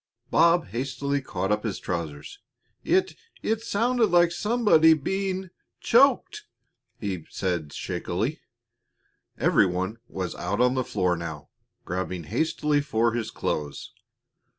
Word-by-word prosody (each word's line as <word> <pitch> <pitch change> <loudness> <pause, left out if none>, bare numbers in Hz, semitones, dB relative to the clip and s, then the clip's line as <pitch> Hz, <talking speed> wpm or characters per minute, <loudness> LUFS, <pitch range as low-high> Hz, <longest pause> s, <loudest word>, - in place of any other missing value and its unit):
Bob 170 0 +4
hastily 140 +5 -2
caught 95 -6 -3
up 105 0 +1
his 110 -4 -2
trousers. 80 -5 -5 0.4
"It 370 +2 +2 0.3
it 220 0 0
sounded 230 +1 +1
like 175 -2 +4
somebody 205 -6 +4
being 190 +4 -2 0.3
choked," 275 - +3 0.5
he 95 -7 -4
said 85 -6 -2
shakily. - - -3 1.0
Every - - +4
one 95 +5 -3
was 95 -2 -4
out - - -3
on 125 0 +4
the 130 -1 0
floor 90 -6 0
now, 80 -3 -7 0.4
grabbing 90 -1 -3
hastily 150 - 0
for 115 -5 +1
his 115 -2 -2
clothes. 75 -2 -4
130 Hz, 120 wpm, -26 LUFS, -, 1.0 s, Bob